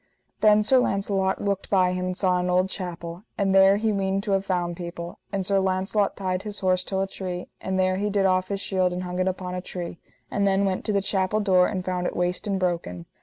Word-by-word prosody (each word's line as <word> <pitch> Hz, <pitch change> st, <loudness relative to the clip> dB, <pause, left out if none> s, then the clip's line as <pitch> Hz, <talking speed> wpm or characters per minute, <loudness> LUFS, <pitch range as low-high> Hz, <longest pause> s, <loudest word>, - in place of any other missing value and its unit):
Then 210 Hz, 0 st, +5 dB
Sir 260 Hz, +4 st, +5 dB
Launcelot 195 Hz, -4 st, 0 dB
looked 200 Hz, -1 st, -1 dB
by 185 Hz, -2 st, +3 dB
him, 180 Hz, 0 st, -2 dB
and 185 Hz, 0 st, -3 dB
saw 185 Hz, -2 st, +2 dB
an 180 Hz, 0 st, -1 dB
old 185 Hz, +1 st, +2 dB
chapel, 170 Hz, -2 st, -6 dB, 0.2 s
and 195 Hz, -1 st, +1 dB
there 195 Hz, +1 st, +6 dB
he 220 Hz, +1 st, +1 dB
weened 195 Hz, -1 st, 0 dB
to 210 Hz, -, -2 dB
have 195 Hz, 0 st, +1 dB
found 175 Hz, -2 st, -1 dB
people; 170 Hz, 0 st, -7 dB
and 195 Hz, -2 st, -2 dB
Sir 195 Hz, 0 st, +2 dB
Launcelot 190 Hz, +2 st, 0 dB
tied 185 Hz, -2 st, -1 dB
his 205 Hz, 0 st, -6 dB
horse 185 Hz, -1 st, +2 dB
till 190 Hz, 0 st, -2 dB
a 195 Hz, -, 0 dB
tree, 180 Hz, -2 st, -6 dB
and 190 Hz, 0 st, -1 dB
there 185 Hz, 0 st, +2 dB
he 205 Hz, +2 st, 0 dB
did 200 Hz, -1 st, +1 dB
off 185 Hz, -1 st, +2 dB
his 200 Hz, -1 st, -2 dB
shield 185 Hz, -2 st, 0 dB
and 180 Hz, +1 st, -3 dB
hung 180 Hz, 0 st, -4 dB
it 185 Hz, -, +1 dB
upon 185 Hz, -1 st, -3 dB
a 180 Hz, -, -3 dB
tree, 175 Hz, -2 st, -6 dB, 0.3 s
and 200 Hz, -1 st, +1 dB
then 195 Hz, 0 st, +2 dB
went 190 Hz, -1 st, -1 dB
to -, -, 0 dB
the 200 Hz, -1 st, +1 dB
chapel 195 Hz, +1 st, 0 dB
door, 185 Hz, -3 st, +4 dB
and 185 Hz, -3 st, -3 dB
found 180 Hz, -1 st, -1 dB
it -, -, -4 dB
waste 180 Hz, +4 st, -1 dB
and 195 Hz, -2 st, 0 dB
broken. 170 Hz, -, -2 dB
190 Hz, 245 wpm, -25 LUFS, 180-195 Hz, 0.3 s, there